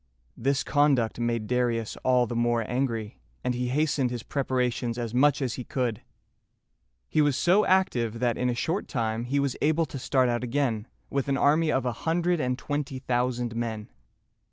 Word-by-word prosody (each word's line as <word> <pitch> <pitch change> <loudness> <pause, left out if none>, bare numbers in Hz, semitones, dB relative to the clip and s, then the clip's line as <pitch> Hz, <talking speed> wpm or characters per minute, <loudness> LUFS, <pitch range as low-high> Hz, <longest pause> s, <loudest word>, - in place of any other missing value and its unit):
This 135 +4 0
conduct 140 -7 +2
made 120 -2 -1
Darius 120 -2 0
all 125 -1 +3
the 120 - -5
more 120 -1 +1
angry, 120 -4 -2 0.2
and 125 -1 0
he 125 0 -2
hastened 140 -1 +1
his 120 -2 -5
preparations 125 -3 -1
as 120 -2 -3
much 140 +2 +3
as 125 -3 -1
he 125 - -5
could. 120 -4 -2 1.1
He 155 - +2
was 145 -3 +2
so 185 +6 +4
active 125 - +2
that 120 0 +1
in 125 - 0
a 120 - 0
short 165 +10 -1
time 115 -2 -2
he 140 +3 0
was 140 -2 0
able 160 +2 +2
to 135 -2 -7
start 130 0 +2
out 120 0 -1
again, 120 -4 -1 0.2
with 140 -1 -1
an 135 -1 +1
army 155 +3 +3
of 130 -1 0
a 125 - +1
hundred 170 +7 0
and 125 -2 0
twenty 145 -1 -3
thousand 120 -2 -1
men. 110 -2 -3
125 Hz, 180 wpm, -27 LUFS, 120-140 Hz, 1.1 s, so